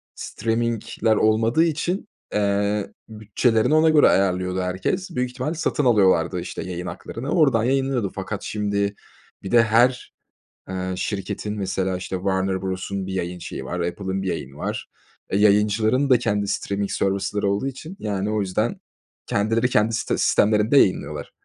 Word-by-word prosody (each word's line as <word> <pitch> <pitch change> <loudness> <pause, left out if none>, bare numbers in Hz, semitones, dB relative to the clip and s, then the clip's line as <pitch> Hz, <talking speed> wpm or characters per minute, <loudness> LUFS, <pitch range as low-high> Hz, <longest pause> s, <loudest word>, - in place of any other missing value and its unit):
streaming'ler 115 -1 -1
olmadığı 110 +8 +3
için, 170 +5 -1 0.3
eee, 100 0 0 0.2
bütçelerini 110 +4 +1
ona 160 +1 +5
göre 155 -1 +6
ayarlıyordu 95 -1 +1
herkes. 95 - -2
Büyük 125 0 0
ihtimal 130 +6 -3
satın 155 -3 -1
alıyorlardı, 105 -6 +3
işte, - - -6
yayın 90 -1 -5
haklarını 125 +5 -6
oradan 135 -10 +3
yayınlanıyordu. 130 -5 0
Fakat - - -5
şimdi 100 -1 -1 0.5
bir 95 - -6
de 120 -1 +6
her, 120 +3 +2 0.6
ııı, 95 0 -3
şirketin 105 +1 -3
mesela, 95 -1 -1
işte, 95 +1 -4
Warner 95 0 -1
Bros'un 95 +1 -3
bir 95 - -5
yayın 90 -1 -3
şeyi 65 - -7
var, 90 +6 -4
Apple'ın 95 +3 -3
bir 95 - -2
yayını 70 -5 -4
var. - - -4 0.4
E, 95 - +1
yayıncıların 105 +6 +3
da 125 - +6
kendi 105 -4 -1
streaming 100 0 -2
service'ları 100 +1 0
olduğu 100 +6 -1
için, 155 +8 -7
yani, 105 -1 -2
o 110 -1 0
yüzden 95 -2 -1 0.5
kendileri 115 +4 +1
kendi 110 -1 +2
sis - - -2 0.2
sistemlerinde 105 +5 +3
yayınlıyorlar. 95 -8 +2
105 Hz, 150 wpm, -23 LUFS, 95-120 Hz, 0.6 s, göre